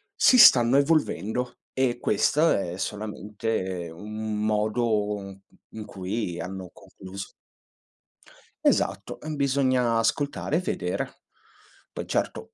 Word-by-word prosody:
si 255 - +5
stanno 125 - +8
evolvendo 125 -5 0 0.2
e 130 -2 +1
questo 150 +10 +2
è 90 -2 -1
solamente 105 -3 -4
un 105 +4 -4
modo, 105 0 +1
uhm, 100 -1 -9 0.3
in 110 -1 -8
cui 95 -1 -4
hanno 95 0 -6
concluso 95 +1 -10 1.4
Esatto, - - +1
ehm, 155 0 -5
bisogna 130 -4 +2
ascoltare 140 +6 0
e 165 - +3
vedere. 90 - -3 0.7
Poi, - - -6
certo - - -2
110 Hz, 105 wpm, -26 LUFS, 100-125 Hz, 1.4 s, stanno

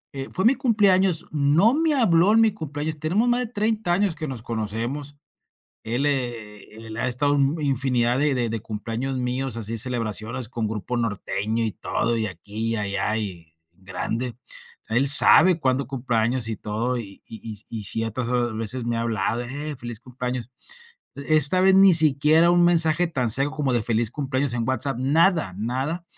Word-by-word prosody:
eh, 135 0 -6
fue 190 - -2
mi 240 - +6
cumpleaños, 195 - +2
no 155 - +3
me 315 0 +1
habló 195 -6 +3
en 225 - +5
mi 225 -1 +4
cumpleaños, 155 -4 -5
tenemos 185 +10 0
más 240 0 +2
de 250 - -2
30 215 -4 -1
años 195 -1 +1
que 155 0 -6
nos 125 -5 -7
conocemos. 120 +6 -4 0.7
Él, 120 +6 -1
eh, 115 -7 -3
él 110 - -8
ha 115 - 0
estado, 145 +4 +1
mm, 140 +3 +1
infinidad 130 -3 +1
de 145 -1 +2
de 120 -2 0
de 115 0 -3
cumpleaños 115 +5 -4
míos, 125 0 -2
así 115 0 -4
celebraciones 115 0 -2
con 115 -3 -3
grupo 110 +3 -4
norteño 110 0 -2
y 110 - -1
todo, 115 +6 -1
y 110 -1 0
aquí 105 +4 -4
y - - +1
allá 105 0 -1
y 85 -7 -6 0.2
grande. 100 +7 -4 0.5
Él 120 +5 +1
sabe 165 +5 +7
cuándo 135 -2 -1
cumplo 130 -3 -3
años 115 +2 +1
y 110 - -2
todo, 115 +5 -3
y 100 -4 -8
y 115 - -8 0.2
y 105 - -11
y 110 -2 -6
ciertas 115 +4 -2 0.3
veces 115 +3 -3
me 120 0 -2
ha - - -1
hablado: 115 0 -1
"Eh, 145 +4 -4
feliz 120 -2 -7
cumpleaños". 125 -1 -6 0.7
E 140 +3 0
esta 155 +5 +4
vez 190 0 +5
ni 195 -1 +7
siquiera 155 +2 +4
un 175 0 +4
mensaje 170 0 +3
tan 125 -8 -2
seco 135 +5 +2
como 140 -4 -1
de 120 -2 +1
feliz 115 0 0
cumpleaños 135 -1 -2
en 120 0 -2
WhatsApp, 130 0 -1
nada, 150 - +2
nada. 130 - -3
130 Hz, 180 wpm, -23 LUFS, 115-155 Hz, 0.7 s, sabe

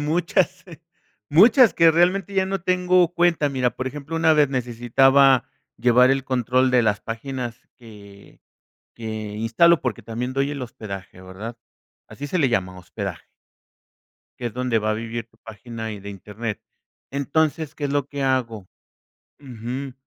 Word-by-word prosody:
muchas 175 +4 0 0.7
muchas 225 - +6
que 165 -1 +6
realmente 185 +4 +1
ya 190 -1 +2
no 195 -1 -2
tengo 180 -1 +2
cuenta. 170 -4 +2
Mira, 130 -3 0
por 130 - -5
ejemplo, 150 +4 -5
una 160 0 +4
vez 150 -3 +4
necesitaba 130 +1 +3 0.3
llevar 125 +1 +4
el 135 0 0
control 130 0 +1
de 125 -1 +4
las 105 -2 +1
páginas 120 +1 -6
que 100 -4 -15 0.6
que 115 - -12
instalo, 110 +9 +1
porque 125 -4 -3
también 120 +3 -4
doy 135 +2 -1
el 140 -2 -5
hospedaje, 100 -6 -8
¿verdad? 100 +6 -8 0.5
Así 145 - -8
se 185 - -1
le 140 - +3
llama, 95 -5 -1
hospedaje 90 -2 -7 1.1
que 120 - -4
es 120 - -4
donde 125 -2 0
va 110 0 -1
a - - +1
vivir 115 +1 -5
tu 110 - -30
página, 110 0 -8
y 105 - -8
de 100 +1 -8
Internet. 105 +3 -6 0.5
Entonces, 150 +2 -1
¿qué 145 - -5
es 140 - -1
lo 145 -1 0
que 140 -1 -5
hago? 115 -7 -1 0.7
Ujú. 130 +1 -6
130 Hz, 155 wpm, -22 LUFS, 115-150 Hz, 1.1 s, muchas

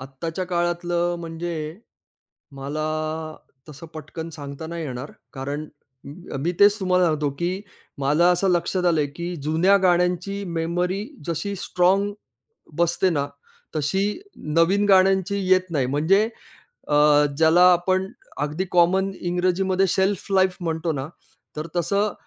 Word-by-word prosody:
आत्ताच्या 165 +7 -5
काळातलं 175 0 0
म्हणजे 165 0 -5 1.0
मला 145 +3 -4 0.9
तसं 150 +2 -10
पटकन 160 +2 -7
सांगता 145 0 -7
नाही 170 0 -5
येणार 130 0 -6 0.2
कारण 140 +2 -4 0.4
अ, - - -10 0.3
म 135 - -3
मी 175 - 0
तेच 205 +1 +6
तुम्हाला 185 -1 +3
सांगतो, 155 -3 +1
की 175 +7 -3 0.4
मला 150 +5 +3
असं 190 +2 +1
लक्षात 180 +1 0
आलंय, 155 -4 +2
की 170 +5 -6
जुन्या 165 +6 +3
गाण्यांची 180 +2 +1 0.2
मेमरी 180 +4 -1 0.2
जशी 185 +5 -2
स्ट्राँग 190 +3 +1 0.7
बसते 170 +2 +2
ना, 145 -3 0 0.5
तशी 195 - 0 0.4
नवीन 190 +5 +4
गाण्यांची 190 0 +4
येत 185 -1 +3
नाही. 140 -6 0
म्हणजे 165 - +2 0.6
अ, 150 - +1 0.4
ज्याला 165 +2 +5
आपण 185 +2 +1 0.3
अगदी 150 +5 -1
कॉमन 185 +3 +3
इंग्रजीमध्ये 185 +2 +1
शेल्फलाईफ 190 0 +1
म्हणतो 165 -1 -2
ना, 135 -1 -4 0.5
तर 155 +2 -4
तसं 200 +5 +1
175 Hz, 125 wpm, -23 LUFS, 155-185 Hz, 1.0 s, तेच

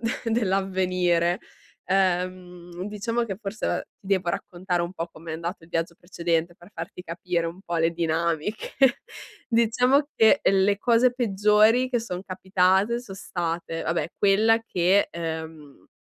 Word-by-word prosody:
de 230 +1 -2
dell'avvenire. 185 -4 +1 0.5
Ehm, 180 -1 -1
diciamo 220 +3 -2
che 200 -4 -5
forse, 210 0 -4
uhm, - - 0 0.2
ti - - -17
devo 190 -3 +1
raccontare 180 -2 -2
un 170 +1 -4
po' 170 -2 -4
com'è 165 0 -8
andato 170 +2 -5
il 165 - -16
viaggio 165 +1 -2
precedente 170 -1 -2
per 175 +4 -17
farti - - -7
capire 170 0 -2
un 170 +3 -7
po' 175 -3 -3
le 165 0 +2
dinamiche. 165 +4 -1 0.8
Diciamo 250 +4 +3
che 220 +6 +5
le 195 +1 +3
cose 240 +2 +3
peggiori 215 +2 +3
che 245 -2 0
son 180 -5 -5
capitate 190 +4 +1
son 210 -6 -10
state, 170 -3 -4
vabbè, 165 0 -1
quella 215 +3 +4
che, 185 +2 +3
ehm, 160 - -7
185 Hz, 140 wpm, -25 LUFS, 170-210 Hz, 0.8 s, che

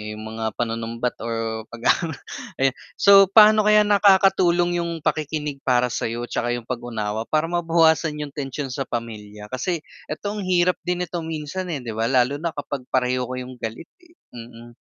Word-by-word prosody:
yung 110 - -9
mga 110 -1 -3
panunumbat 115 +1 -3
or 115 -1 -3
pag 120 0 -10
aano 160 -4 +1 0.5
ayan 135 -1 +2 0.2
so 195 0 +7
paano 215 +1 +6
kaya 210 0 +6
nakakatulong 190 -4 +4
yung 170 -1 -3
pakikinig 150 -2 -2
para 125 -1 +3
sa'yo, 115 0 -3
'tsaka 120 0 -1
yung 120 - -6
pag-unawa 115 -3 -3
para 155 0 +1
mabawasan 165 -3 +2
yung 145 - -8
tensyon 135 -2 -4
sa 135 +1 -4
pamilya 105 -3 -7
kasi 155 +6 -2 0.2
eto 200 +7 -4
ang 200 - -4
hirap 180 0 +2
din 180 0 0
ito 175 - -5
minsan, 160 +3 -4
eh, 140 -5 -4
'di 115 - -5
ba 115 +1 0
lalo 130 +2 +2
na 165 -1 -3
kapag 140 -3 -5
pareho 125 -1 0
kayong 125 -1 -7
galit, 115 +9 -6
eh, 335 0 -23 0.2
mm. 120 0 -11
135 Hz, 170 wpm, -23 LUFS, 120-170 Hz, 0.5 s, so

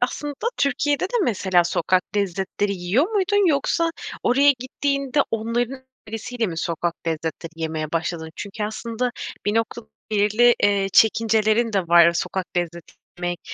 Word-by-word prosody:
aslında 290 +4 -2 0.2
Türkiye'de 285 +2 +1
de 435 +6 -1
mesela 190 - +2
sokak 180 +2 +1
lezzetleri 200 +1 -1
yiyor 185 - +1
muydun? 410 -1 +2
Yoksa 330 +3 +1 0.3
oraya 275 +4 +5
gittiğinde 275 +2 -1
onların 240 +4 -2 0.2
önerisiyle 225 +2 -3
mi 165 -4 -5
sokak 170 +1 -2
lezzetleri 160 +1 -3
yemeye 160 -1 -3
başladın? 165 -1 -2
Çünkü 205 +1 -5
aslında 230 +3 -3 0.4
bir 205 - +1
nokta 225 +1 -1 0.3
belirli, 215 +3 +4
eee, 200 -1 +3
çekincelerin 220 +1 +3
de 200 - +2
var. 170 0 +7
Sokak 185 +2 -2
lezzeti 170 -1 -3 0.2
yemek 175 0 -3
215 Hz, 135 wpm, -22 LUFS, 175-250 Hz, 0.4 s, var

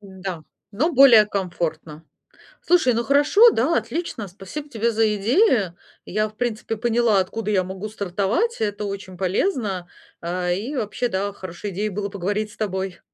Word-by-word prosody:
Да, 190 -4 -7 0.3
но 305 +12 0
более 245 -6 +8
комфортно. 165 -5 -4 0.6
Слушай, 335 -8 +3
ну 235 +1 0
хорошо, 290 - +6
да, 335 - +1
отлично, 235 - -4
спасибо 200 +11 -8
тебе 230 -2 0
за 220 -1 +2
идеи. 220 - +2 0.3
Я, 215 +3 -1
в 215 - -21
принципе, 225 -2 -3
поняла, 235 -2 +2
откуда 210 +3 -3
я 190 -3 +2
могу 190 +3 -6
стартовать, 205 - -1
это 210 -1 -2
очень 195 -2 -6
полезно. 195 - -1 0.3
А, 180 +1 -2
и 215 +11 -3
вообще, 225 0 -1
да, 200 -2 -2
хорошей 185 +1 -7
идеей 205 +4 -2
было 200 0 -4
поговорить 205 +2 -2
с - - -17
тобой. 190 -4 -3
210 Hz, 155 wpm, -22 LUFS, 190-235 Hz, 0.6 s, более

